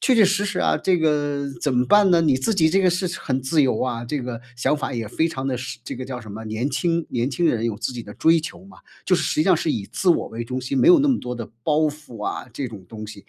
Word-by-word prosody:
确 260 - +3
确 220 -3 +6
实 200 +2 +1
实 - - -2
啊， - - +2
这 185 -2 +3
个 145 -2 0 0.2
怎 140 -3 0
么 125 - +3
办 205 +6 +5
呢？ 170 -1 +5
你 140 -5 +3
自 200 +12 0
己 160 -4 +3
这 195 +4 +3
个 185 - +4
是 180 +1 0
很 130 -1 -2
自 150 +4 +2
由 125 -5 +1
啊， 120 -2 -2
这 145 +3 -2
个 120 -2 -5 0.2
想 120 - +1
法 140 -2 -3
也 115 -2 -3
非 160 +9 0
常 135 -3 -5
地 130 -2 -1
时 120 -1 -6
这 - - -5
个 130 - -6
叫 130 -2 -5
什 105 - -10
么， 110 +2 -7
年 110 +6 -2
轻， 170 -1 0
年 125 +2 -1
轻 175 - -1
人 115 -5 +1
有 110 - -2
自 125 - -3
己 120 -2 -6
的 105 - -11
追 165 0 +4
求 165 - -8
嘛。 195 - -16 0.3
就 185 - +3
是 180 - +1
实 - - 0
际 155 - +3
上 185 +1 +4
是 160 - -1
以 105 -8 -2
自 190 - -2
我 170 - +3
为 115 +1 -5
中 125 +2 -4
心， 130 +2 -2
没 - - +5
有 355 -3 +8
那 290 - +2
么 260 - +3
多 125 0 -5
的 115 -2 -7
包 150 +2 +2
袱 145 -8 -3
啊 - - -4
这 130 +3 -4
种 105 -5 -9
东 110 -1 -8
西。 105 -2 -11
140 Hz, 325 characters per minute, -22 LUFS, 120-170 Hz, 0.3 s, 有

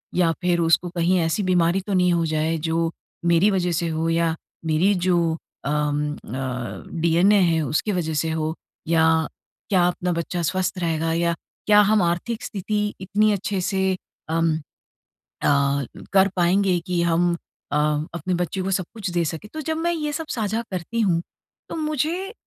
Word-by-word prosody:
या 175 -2 +3
फ़िर 175 -1 +2
उसको 170 +1 +3
कहीं 175 +1 +1
ऐसी 165 +4 0
बीमारी 180 0 +2
तो 200 - -1
नहीं 180 -1 +3
हो 170 -1 +1
जाए 160 +1 0
जो 165 +1 0 0.3
मेरी 170 +4 +4
वजह 180 -2 +1
से 170 0 0
हो? 160 0 -1
या 165 0 +1 0.3
मेरी 160 +6 +3
जो 180 -1 +4 0.5
अम, 150 0 0
अ, 125 -1 -5 0.2
डीएनए 175 +5 +4
है 165 -2 +3
उसकी 160 +9 0
वजह 170 -4 -1
से 160 +2 0
हो 160 0 -1 0.3
या 160 -1 +3 0.4
क्या 180 -3 +4
अपना 180 0 -1
बच्चा 170 +1 -2
स्वस्थ 185 +3 -1
रहेगा 165 -1 0
या 170 0 +1 0.3
क्या 210 0 +7
हम 215 - +4
आर्थिक 175 +7 -1
स्थिति 210 +1 -2 0.2
इतनी 210 +3 +2
अच्छे 200 -1 -2
से 190 +1 0 0.5
उम, 165 -1 +2 0.7
अ, 140 -1 0 0.3
कर 195 0 +6
पाएँगे 180 +1 +3
कि 175 -1 +1
हम 170 +1 +2 0.4
अ, 145 - +2 0.4
अपने 180 +2 -2
बच्चे 180 +2 -2
को 190 - -2
सब 185 -2 0
कुछ 215 -5 -4
दे 175 -1 +1
सकें। 160 +6 -5
तो 310 - -4
जब 315 +2 -2
मैं 340 +1 0
ये 300 -2 -2
सब 320 +1 -4
साझा 220 0 -1
करती 185 +6 -3
हूँ 175 -6 +2 0.5
तो - - -5
मुझे 320 - -1
175 Hz, 170 wpm, -23 LUFS, 165-195 Hz, 0.7 s, क्या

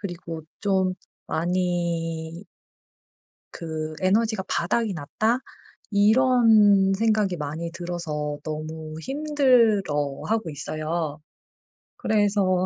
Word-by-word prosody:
그리고 170 -4 -6 0.2
좀 190 -2 +1 0.3
많이 170 0 -2 1.1
그 155 -1 -5
'에너지가 215 +2 +2
바닥이 210 +4 0
났다.' 215 - 0 0.5
이런 215 -3 +5
생각이 215 -3 +1
많이 155 +2 -4
들어서 165 -4 -4
너무 155 0 -6
힘들어하고 225 - +1
있어요. 155 +1 -3 0.8
그래서 200 -4 +2
180 Hz, 185 characters per minute, -24 LUFS, 160-210 Hz, 1.1 s, 이런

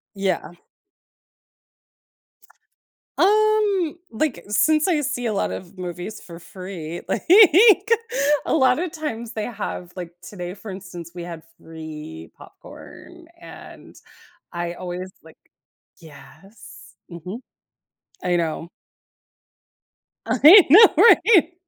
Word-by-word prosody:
Yeah. 195 -4 -3 2.7
Um, 415 -4 +1
like, 260 +4 -3
since 305 - +1
I 320 -5 +1
see 275 -4 -4
a 225 - -1
lot 200 - -2
of 185 +1 -9
movies 180 +3 -7
for 170 -1 -12
free, 175 -2 -9
like, - - -2 1.2
a - - -1
lot 260 +1 +2
of 350 -1 -4
times 235 -7 -6
they 215 - -4
have, 200 -6 -7
like 175 -1 -7
today, 180 -1 -8
for 205 +1 -10
instance, 180 -3 -10
we 175 -1 -8
had 170 -2 -9
free 150 - -11
popcorn - - -15
and - - -14 0.6
I 175 0 -5
always 180 +1 -7
like 160 - -18 0.6
Yes. 160 +7 -16
Mhm. 180 +7 -9 0.8
I 180 -1 0
know. 165 0 -3 1.6
I 365 +6 +7
know 415 +9 +8
right? 385 -7 +5
190 Hz, 105 wpm, -21 LUFS, -, 2.7 s, know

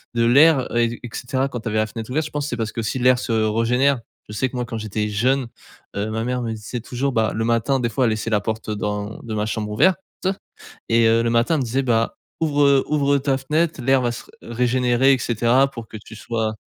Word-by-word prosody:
de 115 0 +2
l'air 135 +1 +4
et 120 0 +1
et 120 - -6
cetera 130 +2 -2
quand 120 - -5
tu 115 - -4
avais 110 - -1
la 110 - +2
fenêtre 110 +1 -7
ouverte, 150 +4 0
je 155 - -8
pense, 145 -1 -3
c'est 120 - -4
parce 110 -1 -2
qu'aussi 115 +2 -3
l'air 125 0 +4
se 120 - -4
régénère. 115 +5 +2 0.3
Je - - -7
sais 130 +5 0
que 130 - -10
moi 125 - -1
quand 120 -1 -5
j'étais 105 0 -3
jeune, 125 +5 +1 0.5
heu, 105 +2 -1
ma 110 +1 -2
mère 125 +1 -2
me 115 -2 -3
disait 110 +3 -6
toujours, 125 +4 -2
bah, 110 -2 +1
le 115 - -1
matin 120 +4 +1
des 120 - 0
fois 125 +3 +1
elle 115 - +2
laissait 110 +1 -2
la 105 -2 +2
porte 110 +2 -4
dans 105 0 -3
de 115 - -6
ma 105 0 -1
chambre 110 -1 -3
ouverte 170 - +3 0.9
et 115 0 +4
heu, 115 +1 +3
le 115 - +1
matin 120 +7 +2
elle - - 0
me - - -1
disait 125 +4 0
bah: 115 -3 +1 0.3
«Ouvre, 145 -2 +2
heu, 140 -1 +4
ouvre 140 -2 +2
ta 135 -1 0
fenêtre, 155 +3 -1
l'air 135 +2 +3
va 120 -1 0
se - - -8 0.2
régénérer 125 +2 +2
et - - +2
cetera, 120 +3 +2
pour 115 -4 -9
que 110 - -8
tu 110 +1 -13
sois» 110 -1 -3
120 Hz, 250 wpm, -21 LUFS, 110-135 Hz, 0.9 s, l'air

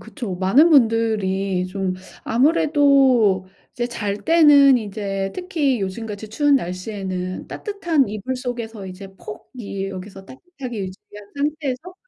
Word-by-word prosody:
그쵸. 230 -11 -6
많은 240 - +4
분들이 210 -7 +2
좀 185 0 -3 0.3
아무래도 265 - +3 0.3
이제 240 -1 -2
잘 210 -4 -3
때는 290 -5 +6
이제 195 -2 -4
특히 315 - -1
요즘같이 210 +2 -5
추운 290 +5 +2
날씨에는 185 -2 -4
따뜻한 345 - -1
이불 215 +5 -4
속에서 235 -5 -5
이제 190 +1 -9
폭 215 - -9
이 200 -3 -4
여기서 195 0 -9
따뜻하게 260 - -8
유지한 200 +2 -9
상태에서 295 +3 -3
225 Hz, 285 characters per minute, -21 LUFS, 195-280 Hz, 0.3 s, 때는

